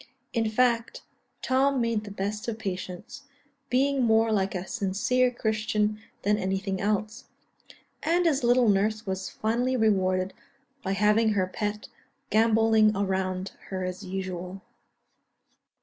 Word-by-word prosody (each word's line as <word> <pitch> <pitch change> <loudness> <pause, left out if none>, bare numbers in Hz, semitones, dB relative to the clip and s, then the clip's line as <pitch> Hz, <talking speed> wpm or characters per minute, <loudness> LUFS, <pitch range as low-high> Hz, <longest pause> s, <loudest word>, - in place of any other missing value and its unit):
In 225 -1 +1
fact, 230 0 +1 0.4
Tom 265 +1 +2
made 230 -3 0
the - - -7
best 205 +2 -4
of 225 -2 -3
patients, 185 +6 -6 0.4
being 270 +2 +2
more 225 -1 +3
like 195 -2 0
a 180 0 -3
sincere 245 +5 +1
Christian 215 -2 -1 0.2
than 210 +1 +2
anything 190 0 -2
else; 215 +2 -1 0.8
and 345 +2 +2
his 290 -6 +2
little 245 0 +4
nurse 215 +2 +1
was 190 -1 -3
finally 245 +4 0
rewarded, 190 -4 +1 0.5
by 195 -1 -2
having 210 +2 +3
her 190 -2 +1
pet 210 +2 -4 0.4
gambolling 220 -1 +4
around 190 -1 -1 0.2
her 185 -1 -4
as 185 +2 -5
usual. 185 0 -5
210 Hz, 125 wpm, -27 LUFS, 190-230 Hz, 0.8 s, little